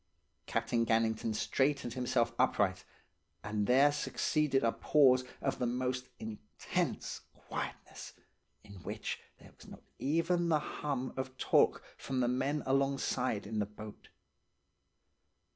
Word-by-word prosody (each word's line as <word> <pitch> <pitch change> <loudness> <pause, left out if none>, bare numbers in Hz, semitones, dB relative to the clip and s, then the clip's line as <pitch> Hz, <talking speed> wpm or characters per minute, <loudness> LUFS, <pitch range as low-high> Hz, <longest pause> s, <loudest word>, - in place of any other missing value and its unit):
"Captain 115 +1 +1
Gannington 110 -1 +1
straightened 135 0 0
himself 120 -2 +1
upright, 95 -2 +2 0.6
and 105 -1 -1
there 135 +4 +6
succeeded 145 -2 +1
a 115 - +3
pause 130 -3 +4 0.2
of 135 - -1
the 125 - +1
most 125 +1 -1
intense 105 -10 -3
quietness, - - -6 0.5
in 100 -3 -12
which - - -4 0.2
there - - -16
was - - -16
not - - -12 0.2
even 170 +3 +1
the 155 - +4
hum 140 -3 -3
of 130 0 -5
talk - - +3
from 130 -1 -3
the 125 - +2
men 135 +4 0
alongside 135 -4 0
in 110 +1 -3
the 105 - 0
boat. 105 0 -11
125 Hz, 125 wpm, -33 LUFS, 110-135 Hz, 0.6 s, there